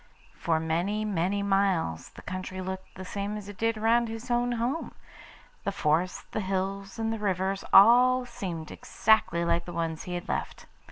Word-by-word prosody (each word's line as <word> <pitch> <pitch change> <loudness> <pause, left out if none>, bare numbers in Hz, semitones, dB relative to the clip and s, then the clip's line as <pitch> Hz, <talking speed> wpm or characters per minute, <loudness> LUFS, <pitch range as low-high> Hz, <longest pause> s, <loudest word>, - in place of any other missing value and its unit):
For 165 -2 0
many, 175 +7 -1
many 200 0 0
miles 195 - +1
the - - -14
country 185 0 -5
looked 190 0 -6
the 185 - -8
same 200 +2 -3
as 205 -2 -8
it 205 - -8
did 225 0 +1
round 230 +2 +3
his 225 +2 -6
own 240 0 +1
home. 240 +7 -2 0.7
The 200 - -1
forests, 170 0 0
the - - -2
hills, 195 0 -3
and 225 0 -1
the 225 - -4
rivers 195 -1 -1
all 250 +5 +7
seemed 180 -10 -6
exactly 195 -5 +2
like 170 0 +1
the 175 - -7
ones 165 -1 -2
he 180 - -4
had 175 - -5
left. - - -3
195 Hz, 175 wpm, -28 LUFS, 175-220 Hz, 0.7 s, all